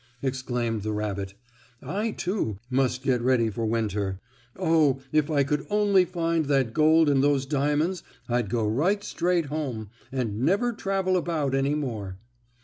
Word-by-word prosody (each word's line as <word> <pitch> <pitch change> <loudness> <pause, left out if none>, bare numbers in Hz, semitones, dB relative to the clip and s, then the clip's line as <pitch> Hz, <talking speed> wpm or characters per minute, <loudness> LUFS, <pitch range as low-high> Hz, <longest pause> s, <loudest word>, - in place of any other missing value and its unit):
exclaimed 125 -4 -2
the 110 +1 -3
rabbit. 100 -2 -3 0.4
"I, 210 +9 -2
too, 180 - -2
must 130 -1 +1
get 130 -3 +1
ready 120 -3 +2
for 115 +2 -2
winter. 105 -4 -1 0.4
Oh, 160 -7 +3
if 155 0 +2
I 145 -3 +3
could 145 +1 -1
only 205 -3 +4
find 165 -2 0
that 135 -5 +1
gold 155 +2 +5
and 140 -2 +3
those 140 -2 +2
diamonds 150 +5 0 0.3
I'd 120 -4 0
go 115 -1 0
right 175 - +1
straight 175 -3 0
home, 135 -8 -4 0.2
and 115 -6 -2
never 200 - +2
travel 195 -3 0
about 160 -6 -1
any 135 +2 +1
more." 110 -10 -4
140 Hz, 150 wpm, -26 LUFS, 115-165 Hz, 0.4 s, gold